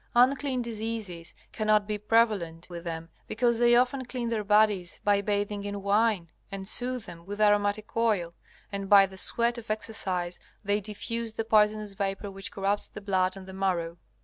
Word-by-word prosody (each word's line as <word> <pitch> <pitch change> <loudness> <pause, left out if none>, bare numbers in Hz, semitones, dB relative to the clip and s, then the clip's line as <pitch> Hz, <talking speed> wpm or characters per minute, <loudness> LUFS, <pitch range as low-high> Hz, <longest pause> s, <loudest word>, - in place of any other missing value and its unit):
Unclean 260 +1 +3
diseases 220 -7 -4 0.2
cannot 215 -1 +2
be 210 0 -3
prevalent 210 -7 +1
with 170 0 -7
them 165 0 -5 0.2
because 235 0 +1
they 240 0 +5
often 255 +2 +2
clean 245 -1 -4
their 225 -2 -1
bodies 210 -3 +2
by 205 -1 +3
bathing 205 0 -1
in 200 -1 -5
wine, 200 -4 +1 0.2
and 195 -1 -5
soothe 250 +2 +1
them 170 0 -10
with 205 +3 -7
aromatic 205 0 +2
oil, 210 -7 +1 0.4
and 200 -1 -4
by 200 -1 +8
the 190 0 -11
sweat 235 +5 +2
of 230 - -13
exercise 190 -5 -3 0.2
they 205 +1 +1
diffuse 225 +2 -4
the 225 - -3
poisonous 215 -1 +3
vapor 195 +1 -3
which 195 0 -7
corrupts 200 +1 0
the - - -9
blood 190 -2 0
and 190 - -10
the 190 - -10
marrow. 175 -3 -1
205 Hz, 175 wpm, -28 LUFS, 195-225 Hz, 0.4 s, by